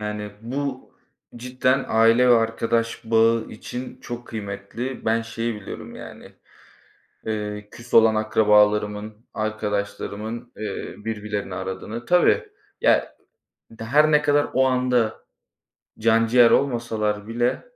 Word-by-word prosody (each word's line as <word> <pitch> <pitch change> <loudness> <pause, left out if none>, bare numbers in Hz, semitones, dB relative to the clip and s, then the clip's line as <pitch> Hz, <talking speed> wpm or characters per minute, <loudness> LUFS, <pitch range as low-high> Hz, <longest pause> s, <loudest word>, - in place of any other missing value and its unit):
Yani, 105 0 -4
bu 130 +3 -5 0.4
cidden 130 +2 0
aile 115 +3 +4
ve 120 - +7
arkadaş 115 0 0
bağı 115 0 +3
için 125 +3 -8
çok 120 0 -7
kıymetli. 110 +4 -6
Ben 115 +1 +1
şeyi 115 0 -3
biliyorum, 105 -2 -9
yani. - - -11 0.9
Eee, 105 -1 -4
küs 120 +1 -13
olan 110 -1 +6
akrabalarımın, 105 0 +2 0.2
arkadaşlarımın, 110 +2 -4
eee, 105 -2 -5
birbirlerini 105 -3 -4
aradığını 105 +6 -6
Tabii, 180 - +3 0.3
ya, - - +2 0.7
her 150 +7 +3
ne 150 0 +5
kadar 145 0 +3
o 130 +1 +4
anda 125 -3 +1 0.7
canciğer 115 +1 +4
olmasalar 110 -5 0
bile 120 +2 0
115 Hz, 110 wpm, -23 LUFS, 105-120 Hz, 0.9 s, ve